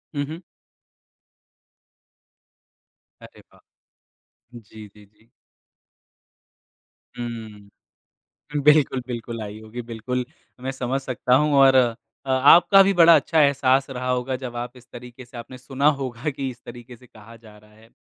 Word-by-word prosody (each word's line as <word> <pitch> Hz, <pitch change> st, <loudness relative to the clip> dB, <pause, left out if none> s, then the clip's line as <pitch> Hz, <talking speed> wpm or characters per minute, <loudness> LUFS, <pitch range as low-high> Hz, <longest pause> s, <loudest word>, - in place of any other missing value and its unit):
हुँ, 145 Hz, 0 st, -2 dB
हुँ। 160 Hz, +3 st, -8 dB, 2.8 s
अरे -, -, -15 dB
वाह! -, -, -23 dB, 1.0 s
जी, 110 Hz, -2 st, -13 dB
जी, 105 Hz, +1 st, -19 dB
जी। 105 Hz, +3 st, -31 dB, 1.9 s
हुँ। 110 Hz, -4 st, -9 dB, 0.8 s
बिल्कुल, 150 Hz, -3 st, +3 dB
बिल्कुल 115 Hz, -2 st, -6 dB
आई 105 Hz, 0 st, -8 dB
होगी 110 Hz, +3 st, -9 dB
बिल्कुल, 120 Hz, +2 st, -4 dB, 0.4 s
मैं 130 Hz, +1 st, -4 dB
समझ 135 Hz, 0 st, -3 dB
सकता 130 Hz, -1 st, -1 dB
हूँ 150 Hz, +2 st, +1 dB
और 135 Hz, -1 st, +6 dB, 0.5 s
अ, -, -, -4 dB
आपका 165 Hz, +9 st, +6 dB
भी 195 Hz, +1 st, +2 dB
बड़ा 170 Hz, -1 st, +7 dB
अच्छा 155 Hz, +2 st, +1 dB
एहसास 135 Hz, -1 st, +2 dB
रहा 125 Hz, -1 st, -5 dB
होगा 125 Hz, +1 st, -2 dB
जब 120 Hz, -2 st, -7 dB
आप 120 Hz, +1 st, -6 dB
इस 125 Hz, 0 st, -17 dB
तरीके 125 Hz, +1 st, -11 dB
से 125 Hz, +1 st, -15 dB
आपने 120 Hz, +2 st, -10 dB
सुना 135 Hz, +2 st, -3 dB
होगा 130 Hz, +1 st, -4 dB
कि 135 Hz, -1 st, -5 dB
इस 120 Hz, -1 st, -14 dB
तरीके 120 Hz, +1 st, -12 dB
से 125 Hz, -, -20 dB
कहा 115 Hz, -2 st, -16 dB
जा 110 Hz, -2 st, -17 dB
रहा 105 Hz, 0 st, -22 dB
है। 110 Hz, +1 st, -21 dB
125 Hz, 140 wpm, -22 LUFS, 115-135 Hz, 2.8 s, बड़ा